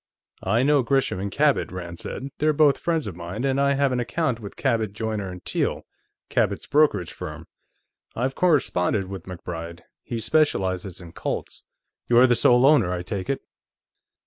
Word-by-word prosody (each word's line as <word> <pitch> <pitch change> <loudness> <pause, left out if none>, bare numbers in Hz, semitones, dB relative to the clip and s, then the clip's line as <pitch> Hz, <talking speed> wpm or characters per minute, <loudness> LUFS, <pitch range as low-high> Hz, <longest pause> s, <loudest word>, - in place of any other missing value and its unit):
"I 110 +6 +2
know 145 0 +4
Gresham 130 -5 +1
and 100 +1 -3
Cabot," 145 +3 +2
Rand 85 -2 -7
said. 135 - -5
"They're 155 +1 +3
both 145 -1 +4
friends 165 -3 0
of 100 - -6
mine, 90 +7 -5
and 135 0 +1
I 140 0 +3
have 140 -1 +2
an 125 - 0
account 125 0 -1
with 100 -3 -9
Cabot, 115 -6 0
Joyner 105 -4 -4
& - - -61
Teale, - - -1 0.4
Cabot's - - 0
brokerage 140 - +2
firm. - - -7 0.7
I've 130 +3 -1
corresponded 105 - +1
with 95 -1 -8
MacBride; 85 -2 -7 0.2
he 115 - -5
specializes 95 - 0
in 85 -2 -11
Colts.... - - -5 0.4
You're 120 +1 +7
the 120 -1 +4
sole 125 +2 +5
owner, 135 -11 +5
I 90 -1 -3
take 95 +5 -5
it?" 135 - -1
115 Hz, 170 wpm, -24 LUFS, 95-140 Hz, 0.7 s, You're